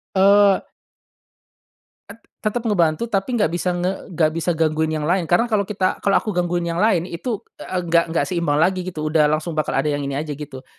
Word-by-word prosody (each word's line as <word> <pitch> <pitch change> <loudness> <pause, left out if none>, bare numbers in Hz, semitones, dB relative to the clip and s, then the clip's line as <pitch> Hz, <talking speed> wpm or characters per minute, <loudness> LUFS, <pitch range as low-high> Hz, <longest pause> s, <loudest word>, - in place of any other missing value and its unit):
Eee 200 +1 +5 1.5
Et 205 - -10 0.2
tetep 220 +3 -2
ngebantu 175 -4 +1
tapi 210 +5 -1
nggak 205 -8 +2
bisa 180 +1 -1
nge 180 +2 -3
nggak 155 -1 +3
bisa 165 +1 -1
gangguin 160 0 +1
yang 155 -1 -2
lain 175 +1 0
karena 175 +6 +3
kalo 205 -3 +1
kita 190 -3 -1
kalo 200 - +2
aku 215 - -1
gangguin 175 -1 -1
yang 170 0 -2
lain 195 -6 +3
itu, 190 +5 -4 0.2
eee, 180 -1 -3
nggak 170 0 +3
nggak - - +2
seimbang 170 -5 -1
lagi 185 +2 +2
gitu 160 -4 -5
udah 155 -1 +4
langsung 155 +3 -1
bakal 155 -2 -2
ada 135 +3 +1
yang 145 - -2
ini 140 -1 -3
aja 150 +1 -3
gitu, 140 -2 -8
175 Hz, 200 wpm, -21 LUFS, 155-195 Hz, 1.5 s, Eee